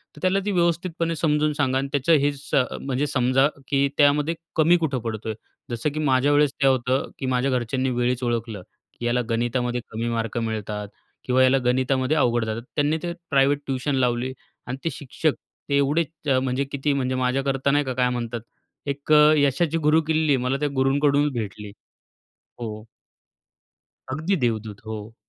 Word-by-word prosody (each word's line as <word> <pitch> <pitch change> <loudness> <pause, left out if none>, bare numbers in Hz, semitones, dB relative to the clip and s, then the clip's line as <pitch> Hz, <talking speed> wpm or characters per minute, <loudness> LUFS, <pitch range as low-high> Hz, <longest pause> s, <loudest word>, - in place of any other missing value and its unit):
तर - - -12
त्याला 185 +1 +2
ती 205 - 0
व्यवस्थितपणे 170 -2 0
समजून 150 -1 +1
सांगा 140 -3 +1
आणि 135 +1 -1
त्याचं 145 +3 +2
हे 145 - +3
स 140 0 -13 0.3
म्हणजे 135 +2 -1
समजा, 130 +1 +3 0.2
की 140 0 +2
त्यामध्ये 150 +3 +3 0.2
कमी 165 +2 +5
कुठं 150 -6 -1
पडतोय. 110 -1 -4 0.4
जसं 120 +5 -1
की 155 - -3
माझ्या 140 -1 +2
वेळेस 145 -1 +3
काय 135 - +5
होतं, 130 +1 0
की 135 - -3
माझ्या 130 +1 +1
घरच्यांनी 130 +1 0
वेळीच 125 0 0
ओळखलं, 115 -4 -2 0.4
की 120 - -4
याला 120 +1 +1
गणितामध्ये 120 +1 -1
कमी 115 +1 -3
मार्क 115 -1 -2
मिळतात 105 -2 -3 0.4
किंवा 130 +1 +3
याला 130 +1 +4
गणितामध्ये 130 +3 +1
अवघड 120 -4 +2
जातात. 110 +1 -3
त्यांनी 150 +2 +2
ते 175 -1 -2 0.2
प्रायव्हेट 140 0 +3
ट्युशन 135 +1 -1
लावली 125 0 0 0.3
आणि 130 +2 -4
ते 165 - 0
शिक्षक 150 +1 -1 0.4
ते 140 - +3
एवढेच 145 +4 +2 0.4
म्हणजे 130 +1 0
किती 140 +1 0
म्हणजे 130 -2 -1
माझ्याकरता 135 +2 0
नाही 145 +1 +2
का 130 - -2
काय 125 0 +1
म्हणतात? 120 -1 -3 0.4
एक 140 +1 -4
अ, 150 0 +7
यशाची 145 +3 +2
गुरुकिल्ली 155 -1 +2
मला 125 +2 -1
त्या 150 0 0
गुरूंककडूनच 140 +2 +2
भेटली. 105 -3 -5 0.9
हो. 110 -2 -6 1.3
अगदी 160 +8 0
देवदूत, 110 -3 -2
हो. 110 0 -7
135 Hz, 165 wpm, -24 LUFS, 120-145 Hz, 1.3 s, अ